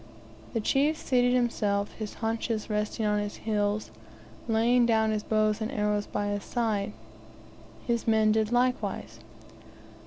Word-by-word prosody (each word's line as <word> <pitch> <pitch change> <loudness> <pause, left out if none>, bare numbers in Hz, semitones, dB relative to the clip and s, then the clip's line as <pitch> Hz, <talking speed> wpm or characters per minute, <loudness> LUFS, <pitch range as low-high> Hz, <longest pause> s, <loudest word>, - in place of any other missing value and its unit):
The 230 - 0
chief 285 +8 +2
seated 245 -3 +2
himself, 210 -4 0
his 215 -2 -6
haunches 225 -1 -2
resting 210 +1 -1
on 210 0 +2
his 205 0 -4
heels, 210 -1 -1 0.6
laying 235 +2 +3
down 220 -1 +3
his 215 -1 -1
bow 215 0 +2
and 220 +2 -3
arrows 210 -3 0
by 205 0 -2
his 205 0 -2
side; 215 -4 -1 0.9
his 235 -2 -1
men 220 -1 +4
did 220 0 +1
likewise. 250 +1 0
220 Hz, 135 wpm, -28 LUFS, 210-235 Hz, 0.9 s, men